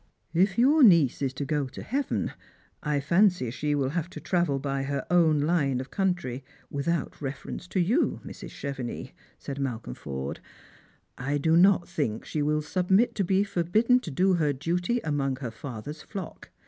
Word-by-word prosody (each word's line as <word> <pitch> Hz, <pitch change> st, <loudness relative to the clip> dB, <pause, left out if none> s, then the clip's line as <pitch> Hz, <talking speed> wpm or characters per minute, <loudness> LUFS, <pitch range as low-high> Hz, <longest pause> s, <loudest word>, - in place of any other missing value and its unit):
" -, -, -43 dB
If 195 Hz, -1 st, -9 dB
your 280 Hz, +6 st, +5 dB
niece 170 Hz, -, +6 dB
is 135 Hz, -2 st, 0 dB
to 140 Hz, -, -3 dB
go 145 Hz, -1 st, 0 dB
to 130 Hz, -, -9 dB
heaven, 275 Hz, +4 st, -1 dB, 0.5 s
I 150 Hz, -1 st, 0 dB
fancy 170 Hz, -, +3 dB
she 150 Hz, +4 st, -1 dB
will 135 Hz, -2 st, 0 dB
have 170 Hz, +2 st, -2 dB
to -, -, -8 dB
travel 175 Hz, -6 st, +1 dB
by 135 Hz, 0 st, -2 dB
her 140 Hz, 0 st, -2 dB
own 160 Hz, -4 st, +4 dB
line 145 Hz, -5 st, +1 dB
of 130 Hz, +1 st, -7 dB
country, 175 Hz, -10 st, -1 dB, 0.3 s
without 150 Hz, +3 st, -2 dB
reference 140 Hz, +5 st, -5 dB
to 190 Hz, -, -1 dB
you. 220 Hz, -, +2 dB
Mrs. -, -, -8 dB
Chevenix," 135 Hz, -4 st, -5 dB, 0.3 s
said 140 Hz, 0 st, -6 dB
Malcolm 120 Hz, -, -3 dB
Forde. 65 Hz, +1 st, -5 dB, 0.5 s
" -, -, -32 dB, 0.3 s
I 140 Hz, +3 st, 0 dB
do 160 Hz, +3 st, +2 dB
not 185 Hz, +1 st, +5 dB
think 140 Hz, -11 st, -2 dB
she 150 Hz, -, -2 dB
will 150 Hz, +1 st, +1 dB
submit 190 Hz, +8 st, +2 dB
to 200 Hz, -, 0 dB
be 190 Hz, +2 st, +2 dB
forljidden 210 Hz, +6 st, +2 dB
to -, -, -6 dB
do 185 Hz, +6 st, +2 dB
her 155 Hz, -5 st, +2 dB
duty 175 Hz, -, -1 dB
among 140 Hz, -3 st, 0 dB
her 125 Hz, -3 st, -5 dB
father's 130 Hz, +5 st, -7 dB
flock. 195 Hz, -5 st, -8 dB
150 Hz, 180 wpm, -27 LUFS, 135-180 Hz, 0.5 s, niece